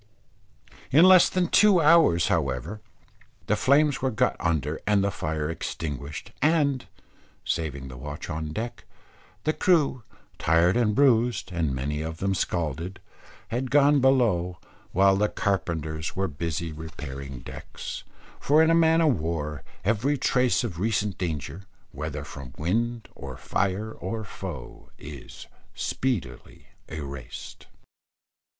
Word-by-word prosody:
In 160 +7 +7
less 185 -1 +8
than 185 -1 +1
two 200 0 +5
hours 155 - +5
however, 70 - -1 0.6
the 105 - +2
flames 140 +5 +3
were 130 - +1
got 125 +1 +1
under 80 -3 -1
and 105 -2 +3
the 100 - +1
fire 80 -3 -2
extinguished; 75 -3 -5
and, 145 -4 +2 0.6
saving 70 -5 -2
the 65 -1 -9
watch 70 +3 -7
on 75 0 -4
deck, 115 +9 -5 0.6
the 155 - +1
crew, 155 -9 +2 0.4
tired 85 +3 +3
and 110 -3 +2
bruised, 120 -6 +3
and 80 -6 -1
many 75 +4 -2
of 80 0 -5
them 95 +2 0
scalded, 85 0 -2 0.5
had 125 +3 -2
gone 145 0 +5
below, 110 -10 +2 0.3
while 95 +1 +4
the 105 +2 +2
carpenters 80 -5 -2
were 95 +1 0
busy 80 +1 -3
repairing 70 -4 -7
decks; - - -8 0.4
for 150 +3 +4
in 160 - +4
a - - +5
man 165 0 +4
of 150 - +3
war 75 -2 -3 0.2
every 115 +8 +1
trace 125 -1 +2
of 90 -8 -4
recent 105 -1 0
danger, 80 -1 -3 0.3
whether 75 0 -5
from 70 -3 -10
wind 115 +8 -1
or 70 -2 -8
fire 100 +3 -1
or 110 +2 -5
foe, 100 - -8
is 70 -4 -10 0.3
speedily 125 -7 -3 0.2
erased. 70 -5 -8
95 Hz, 130 wpm, -26 LUFS, 75-125 Hz, 0.6 s, less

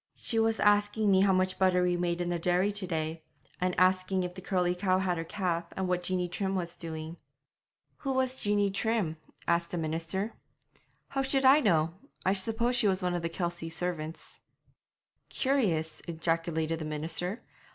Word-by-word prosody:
'She 225 - -1
was 225 0 +2
asking 205 0 +3
me 190 0 +5
how 195 0 +4
much 185 0 +1
butter 185 -1 +4
we 180 0 +2
made 175 0 -1
in 175 - -1
the 175 -1 -1
dairy 180 +4 +2
to 200 -2 -3
day, 160 -1 -2 0.4
and 180 -1 0
asking 185 0 +3
if 180 0 -4
the 185 - -9
curly 180 -1 +1
cow 185 0 +1
had 185 -2 0
her 165 - -3
calf, 170 -1 -2
and 190 -1 -1
what 180 0 0
Jeanie 180 0 -1
Trim 190 +2 -2
was 170 -2 -3
doing.' 160 0 -6 0.8
'Who 270 -1 -2
was 260 0 +1
Jeanie 205 -1 +2
Trim?' 200 -6 0 0.3
asked 170 0 +2
the 175 - -3
minister. 165 +6 -2 0.8
'How 270 - -1
should 270 0 +1
I 270 +3 +8
know? 165 - +2 0.3
I 190 - +4
suppose 225 +5 +1
she 240 -4 +3
was 190 -1 +1
one 180 -1 +1
of 175 - -1
the 165 - -2
Kelsey 170 -1 -3
servants.' 165 -2 -4 0.9
'Curious,' 195 - 0
ejaculated 165 -1 -1
the 155 - -4
minister. 160 +7 -2
180 Hz, 180 wpm, -30 LUFS, 170-205 Hz, 0.9 s, I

